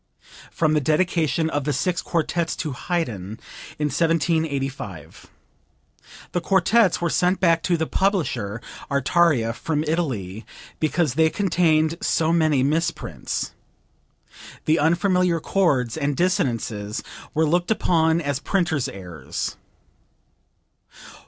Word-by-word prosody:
(From 155 -2 +1
the 150 - +2
dedication 160 +1 +1
of 145 -1 -1
the 150 +1 -1
Six 180 +2 0
Quartets 170 0 -1
to 155 - -3
Haydn 120 - -3 0.4
in 150 0 0
1785. 145 - -1 1.0
The 175 - -1
quartets 195 +1 +3
were 170 - 0
sent 180 +1 +2
back 165 -3 +3
to 175 0 +1
the 160 - 0
publisher, 135 - -1 0.3
Artaria, 140 -4 +2
from 150 +5 -2
Italy, 125 - -2 0.4
because 155 -2 +1
"they 160 +2 +3
contained 165 -4 +2
so 160 0 +1
many 155 -5 +3
misprints." 150 - -2 1.1
The 155 +1 +3
unfamiliar 175 +2 +2
chords 145 - +1
and 145 -2 -1
dissonances 115 - -1 0.3
were 160 +1 +3
looked 175 +3 +1
upon 165 -6 +2
as 145 -3 -2
printers' 160 -6 0
errors. 90 -5 -6
160 Hz, 110 wpm, -23 LUFS, 135-170 Hz, 1.1 s, quartets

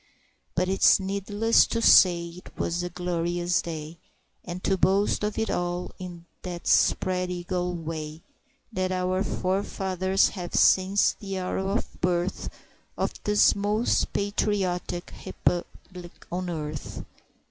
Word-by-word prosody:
But 180 +1 +1
it's 195 +2 +5
needless 200 +3 +2
to 230 - -1
say 175 -5 +5
'twas 170 +1 -3
a 175 - -3
glorious 175 0 -1
day, 160 0 -7 0.4
And 180 +1 -7
to 195 - +2
boast 195 +3 +2
of 210 0 -2
it 225 - 0
all 175 0 -2
in 175 -2 -8 0.2
that 175 -1 -6
spread 180 -1 +2
eagle 180 0 -2
way 160 -1 -6 0.5
That 185 -2 -1
our 185 +1 0
forefathers 190 0 0
have 180 -3 -6
since 190 +2 +4
the 195 -2 -5
hour 185 0 -2
of 195 +4 -3
birth 175 +1 -1 0.5
Of - - -1
this 210 0 +4
most 210 +3 +1
patriotic 195 -3 -1
republic 175 0 -4
on 180 +1 -3
earth! 150 -3 -5
180 Hz, 125 wpm, -26 LUFS, 175-195 Hz, 0.5 s, it's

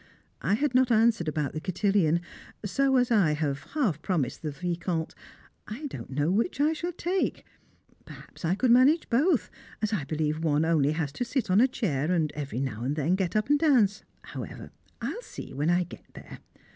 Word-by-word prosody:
I 200 - +2
had 280 +3 0
not 255 0 +4
answered 225 -6 +3
about 150 -2 -1
the 155 - -4
cotillon, 180 -2 +1 0.4
so 270 +6 +2
as 250 -1 +2
I 190 -9 +4
have 145 -2 -2
half 210 - +1
promised 155 -10 -1
the 155 - -3
Vicomte 170 +2 -3 0.5
I 240 +8 -6
don't 285 - -7
know 145 +5 0
which 230 - 0
I 300 +2 +3
shall 345 +3 -3
take; 355 +2 -2 0.6
perhaps - - -13
I 170 +3 +1
could 250 +3 +2
manage 265 +7 +4
both, 285 +4 +2 0.3
as 215 0 -1
I 160 -9 -1
believe 155 +1 -2
one 155 0 +2
only 155 -3 +2
has 155 -3 -2
to 245 - -3
sit 240 -4 -2
on 195 +4 +5
a 260 - +6
chair 165 - -1
and 160 -4 +1
every 140 -4 -4
now 120 -4 -3
and 135 +4 -1
then 155 +3 +1
get 190 -1 -1
up 215 +1 +1
and 290 +1 +3
dance. 235 -11 +3 0.2
However, - - -8 0.3
I - - -2
will 475 - -5
see - - -9
when 145 +4 0
I 175 +1 +3
get 175 - -12
there. - - -11
185 Hz, 195 wpm, -27 LUFS, 155-245 Hz, 0.6 s, a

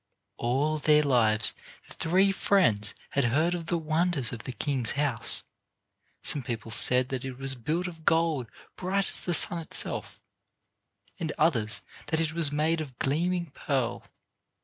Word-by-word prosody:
All 140 +6 0
their 150 0 +4
lives 115 -6 +2 0.3
the - - -12
three 185 +4 +2
friends 120 - +1 0.2
had 140 -2 +1
heard 155 +9 +1
of 170 -2 -5
the 175 - 0
wonders 160 -5 -1
of 115 - -8
the - - -4
king's 125 -1 0
house. 140 -5 -1 0.8
Some 145 - +3
people 115 -2 -5
said 125 +3 +4
that 130 -2 -4
it 130 -2 -6
was 135 0 -2
built 155 +9 -3
of 165 -3 -8
gold 160 -7 +1 0.3
bright 190 +2 -1
as - - -4
the 175 - 0
sun 170 - +6
itself, 165 - 0 1.0
and 160 -2 -3
others 115 -10 +1 0.2
that 160 - 0
it 160 -1 -1
was 165 -4 +5
made 155 +2 0
of 135 -5 -9
gleaming 170 +3 -1
pearl. 130 -5 -2
150 Hz, 155 wpm, -27 LUFS, 125-165 Hz, 1.0 s, sun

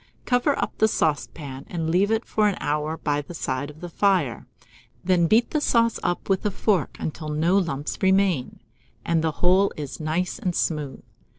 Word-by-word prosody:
Cover 250 +3 +2
up - - -2
the 220 - +5
saucepan, 145 -6 -2
and 165 -2 -2
leave 190 +4 +3
it 225 +1 0
for 215 -1 +2
an 200 - 0
hour 150 +2 -1
by 145 -1 -1
the 170 +4 -10
side 130 -2 -3
of 150 +1 -13
the 175 - -5
fire; 170 - +1 0.6
then 175 -2 +3
beat 225 +6 +3
the 305 - 0
sauce 230 -4 +2
up 175 - -2
with 195 -1 +1
a 210 - +1
fork 195 -4 0
until 155 0 -4
no 160 +5 +1
lumps 150 -6 -3
remain, 190 -10 +2 0.4
and 165 -1 +1
the 160 - +1
whole 190 +3 +4
is 145 -3 -6
nice 165 +7 -2
and 185 -7 -2
smooth. 150 -5 -2
170 Hz, 185 wpm, -24 LUFS, 150-200 Hz, 0.6 s, the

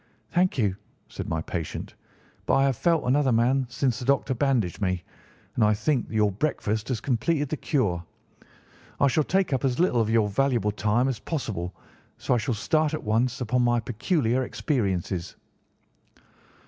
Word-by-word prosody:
"Thank 180 -1 +2
you," 100 -6 +1 0.3
said - - -6
my 80 0 -1
patient, 85 -3 -5 0.5
"but - - +3
I 135 - +4
have 135 -2 +2
felt 165 +5 +2
another 135 +1 +3
man 125 +3 +2
since 125 0 0
the 125 - -5
doctor 140 0 +2
bandaged 115 - 0
me, 90 -3 0 0.5
and 115 - +1
I 105 0 +4
think 120 +4 0
that - - -7
your 105 -1 +3
breakfast 110 -2 -1
has 125 -4 -1
completed 140 +5 0
the 155 - -2
cure. 100 - 0 1.0
I - - +5
shall 145 +3 +3
take 190 -1 +1
up 130 - 0
as 130 -2 +1
little 145 -10 +3
of 110 - 0
your 110 -2 +3
valuable 115 -1 +1
time 105 +5 +1
as 130 -5 -2
possible, 100 - -4 0.4
so - - 0
I 120 - +3
shall 115 +1 -1
start 155 +9 +1
at - - -6
once 120 +4 0
upon 125 +1 +1
my 120 0 +3
peculiar 125 - 0
experiences." 95 - -2
120 Hz, 175 wpm, -26 LUFS, 105-135 Hz, 1.0 s, I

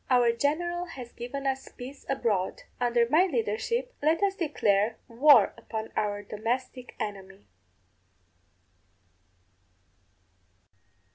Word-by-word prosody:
Our 245 -2 +5
general 345 +8 -1
has 255 -8 -9
given 260 +4 -6
us 265 0 -2
peace 265 +3 -9
abroad; 215 -8 0 0.2
under 240 -1 +2
my 320 +9 +4
leadership 320 - -1
let 320 +5 +2
us 395 -1 +2
declare 225 - +1
war 240 -2 +6
upon 220 -1 -5
our 205 -1 -1
domestic 245 +5 -4
enemy. 195 -1 -6
245 Hz, 95 wpm, -28 LUFS, 220-295 Hz, 0.2 s, war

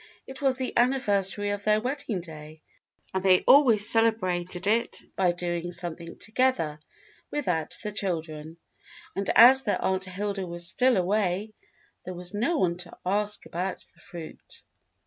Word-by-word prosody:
It 265 +1 -10
was 265 -2 +2
the 260 -1 -4
anniversary 205 -6 +1
of 205 0 -4
their 215 0 +3
wedding 240 -5 -3
day, 155 -2 -12 0.5
and 190 0 -1
they 185 -1 +5
always 235 -7 +5
celebrated 185 -5 0
it 230 +3 +1 0.2
by 185 -2 +3
doing 175 0 -3
something 170 -1 -7
together 220 -11 0 0.5
without 180 - -2
the 210 - -3
children, 160 -5 -4 0.6
and 195 0 -2
as 260 +3 +9
their 210 -6 -1
Aunt 190 0 -1
Hilda 195 0 -4
was 170 0 -4
still 250 +5 +2
away 195 +2 0 0.5
there 185 - -7
was 180 +2 -8
no 240 +11 0
one 175 -7 0
to 180 -1 -8
ask 205 +2 -1
about 180 +2 -4
the 170 - -26
fruit. 170 -2 -11
195 Hz, 145 wpm, -27 LUFS, 175-220 Hz, 0.6 s, as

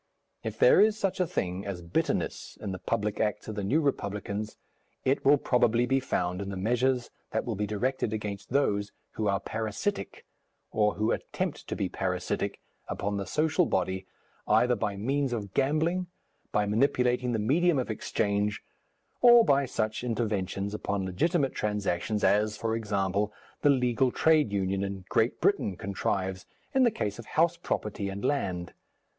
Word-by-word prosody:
If - - -4
there - - +6
is 215 0 +4
such 195 -3 -1
a 180 - +2
thing 90 - -2
as 95 -4 -5
bitterness 85 - -2
in 100 - -4
the 95 - -5
public 105 0 -1
acts 105 -3 -1
of 110 - -4
the 105 -1 -3
New 140 +12 +2
Republicans, 105 -6 -2 0.5
it 135 +2 +2
will 145 +2 +6
probably 120 -2 +2
be 135 +2 +2
found 90 -7 -1
in 100 - -4
the 100 - -4
measures 125 +5 +1 0.2
that - - -1
will 120 - -2
be 105 0 -2
directed 115 +3 -1
against 105 -2 -4
those 105 -7 +1 0.2
who 110 - -2
are 100 -1 +2
parasitic, 110 - -3 0.5
or 105 -1 +2
who 110 +2 +1
attempt - - -3
to - - -3
be - - -1
parasitic, - - -2 0.3
upon 100 0 -2
the 100 -2 -4
social 160 - +2
body, 95 0 -1 0.4
either 125 0 +4
by 100 -2 -2
means 135 +5 0
of 100 -5 -4
gambling, 160 +6 +1 0.4
by 105 - +2
manipulating 125 +2 +2
the 115 - +1
medium 155 +9 +3
of 125 -3 -1
exchange, 105 -1 -1 0.6
or 240 -1 +8
by 140 -1 +3
such 110 -2 -2
interventions 105 -4 -2
upon 100 -2 -2
legitimate 135 - +1
transactions 105 0 -1
as, 105 +1 +3
for 115 0 -1
example, 100 -2 0 0.3
the 145 - +4
legal 125 -1 +3
trade 155 -6 +3
union 95 -1 0
in 95 -1 -5
Great 115 +2 +1
Britain 195 - +1
contrives 95 -1 -2 0.3
in 265 - +3
the 245 - +6
case 105 - -3
of 115 - -9
house 170 +2 +4
property 105 - -3
and 100 +1 -5
land. 90 -11 -1
110 Hz, 165 wpm, -28 LUFS, 100-135 Hz, 0.6 s, or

